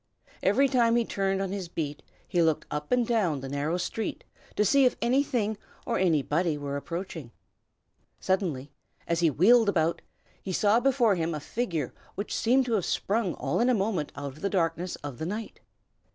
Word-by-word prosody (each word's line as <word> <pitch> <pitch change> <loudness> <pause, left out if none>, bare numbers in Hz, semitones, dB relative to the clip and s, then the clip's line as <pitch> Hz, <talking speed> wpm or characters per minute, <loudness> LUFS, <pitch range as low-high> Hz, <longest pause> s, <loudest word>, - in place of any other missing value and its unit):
Every 250 +9 +4
time 240 -3 +3
he 235 -1 +2
turned 195 -1 -1
on 190 - -3
his 195 -3 -4
beat, 150 -3 -4 0.3
he 175 - +1
looked 160 -2 +2
up 150 0 -4
and 250 -1 +3
down 195 - +1
the 135 - -6
narrow 145 +5 -1
street 215 +4 -3 0.3
to 210 - +2
see 275 +7 +5
if 250 - +3
anything 235 -4 +1 0.3
or - - 0
anybody 165 -1 +1
were 140 -1 -4
approaching. 165 -2 -5 0.9
Suddenly, 165 -8 -1 0.4
as 170 -1 +1
he 170 -2 +4
wheeled 215 - +5
about, 165 -3 +1 0.4
he 190 - -4
saw 210 +5 +4
before 245 -4 +3
him 165 -2 -1
a - - -3
figure 165 - -3 0.2
which 200 - -3
seemed 255 +3 +3
to 240 - -1
have 200 -6 +1
sprung 205 -3 0
all - - -1
in 240 +2 +3
a 250 - +4
moment 195 -7 -1
out 140 -1 -5
of 155 - -15
the 200 - 0
blackness 175 -1 -1
of 140 -4 -6
the 160 - -3
night. 215 +4 -5
190 Hz, 185 wpm, -28 LUFS, 160-225 Hz, 0.9 s, see